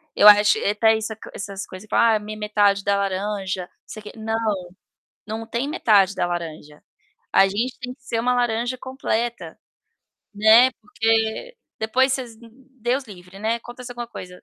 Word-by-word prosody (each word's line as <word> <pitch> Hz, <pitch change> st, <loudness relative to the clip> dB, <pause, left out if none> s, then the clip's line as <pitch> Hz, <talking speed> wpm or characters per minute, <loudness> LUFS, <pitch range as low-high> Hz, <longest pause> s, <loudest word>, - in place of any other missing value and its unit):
eu 205 Hz, -, +7 dB
acho 210 Hz, 0 st, +7 dB
e -, -, -4 dB
até 220 Hz, +2 st, +3 dB
isso 220 Hz, 0 st, -4 dB
co -, -, -10 dB
essas 200 Hz, -1 st, -6 dB
coisa, 185 Hz, +3 st, -11 dB
fala: 230 Hz, -1 st, +4 dB
"Ah, -, -, 0 dB
minha 215 Hz, +1 st, -8 dB
metade 205 Hz, -2 st, +2 dB
da 200 Hz, 0 st, +1 dB
laranja", 195 Hz, -1 st, -2 dB
não -, -, -28 dB, 0.2 s
sei -, -, -9 dB
o -, -, -19 dB
quê. 210 Hz, -, -9 dB
Não, 220 Hz, 0 st, -3 dB, 0.9 s
não 220 Hz, +1 st, -6 dB
tem 235 Hz, +5 st, -2 dB
metade 205 Hz, -, +3 dB
da 180 Hz, -, 0 dB
laranja. 160 Hz, -4 st, -6 dB, 0.5 s
A 195 Hz, -, +6 dB
gente 230 Hz, +6 st, -2 dB
tem 250 Hz, 0 st, -6 dB
que 265 Hz, -, -37 dB
ser 230 Hz, -3 st, -2 dB
uma 250 Hz, +2 st, +1 dB
laranja 240 Hz, +1 st, 0 dB
completa, 240 Hz, -3 st, -3 dB, 0.8 s
né, 220 Hz, +5 st, +6 dB
porque 225 Hz, -, -1 dB, 0.2 s
depois 255 Hz, +5 st, +2 dB
vocês 250 Hz, -4 st, -4 dB, 0.4 s
Deus 250 Hz, +4 st, 0 dB
livre, 185 Hz, -3 st, -13 dB
né, 220 Hz, +3 st, 0 dB
acontece 245 Hz, +1 st, -10 dB
alguma 240 Hz, -1 st, -6 dB
coisa, 180 Hz, -5 st, -10 dB
220 Hz, 175 wpm, -22 LUFS, 200-240 Hz, 0.9 s, eu